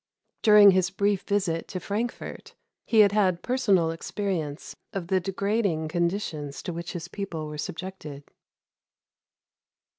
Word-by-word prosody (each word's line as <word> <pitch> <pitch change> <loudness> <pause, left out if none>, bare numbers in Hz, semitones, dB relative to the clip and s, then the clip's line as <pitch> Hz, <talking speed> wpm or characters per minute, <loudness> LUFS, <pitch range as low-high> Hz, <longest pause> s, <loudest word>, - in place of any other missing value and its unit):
During 210 -2 +8
his 185 -1 +2
brief 200 0 0
visit 190 -5 -1
to 185 - -5
Frankfort, 210 +6 -5 0.3
he 220 -2 +6
had 200 -2 +5
had 190 -4 +1
personal 200 -10 +2
experience 165 -3 -4 0.2
of 185 -3 -4
the 190 -1 +3
degrading 195 -3 -1
conditions 170 -4 -2
to 175 - -4
which 170 0 -6
his 170 -1 -5
people 175 -4 -5
were 150 0 -7
subjected. 160 -4 -6
185 Hz, 125 wpm, -26 LUFS, 165-200 Hz, 0.3 s, During